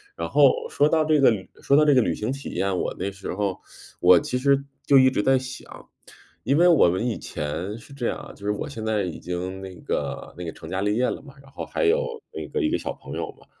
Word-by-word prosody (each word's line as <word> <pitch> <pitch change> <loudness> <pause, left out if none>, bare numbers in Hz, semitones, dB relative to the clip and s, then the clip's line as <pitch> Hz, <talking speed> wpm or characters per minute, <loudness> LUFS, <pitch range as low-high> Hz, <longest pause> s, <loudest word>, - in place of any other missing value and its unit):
然 - - -4
后 470 0 +4
说 145 - +3
到 155 0 +3
这 155 -1 +3
个 135 - +7
旅 100 -5 -2
说 140 - +3
到 150 - +6
这 150 -1 +5
个 130 - +5
旅 85 -7 0
行 110 +4 -2
体 140 +1 -6
验， 95 -1 -1
我 - - -2
那 100 - -3
时 100 0 -6
候， 100 -1 -2 0.4
我 90 0 +7
其 125 - -1
实 140 +1 +2 0.2
就 140 - +6
一 130 0 +6
直 115 - 0
在 135 +3 +4
想。 130 0 -9 0.5
因 140 +4 +2
为 175 - +6
我 165 - +6
们 95 +6 -1
以 115 - -1
前 90 +8 -4
是 115 - -16
这 125 -4 -2
样 - - -2
啊， - - -10
就 100 - -12
是 105 - +1
我 105 - -4
现 115 -6 -6
在 110 -1 +1
已 90 -3 -5
经 90 +2 -5
那 95 -1 -8
个 - - -4
那 90 - -6
个 80 - -4
成 - - -11
家 95 +1 -2
立 105 +1 +1
业 125 +2 +2
了 - - -4
嘛， 140 -1 -13
然 135 -1 -18
后 - - -6
还 485 - -1
有 485 +4 +3 0.3
那 - - -6
个 450 - -2
一 310 - +2
个 345 - +1
小 - - -4
朋 - - -11
友 - - -3
嘛。 - - -22
120 Hz, 290 characters per minute, -24 LUFS, 95-140 Hz, 0.5 s, 个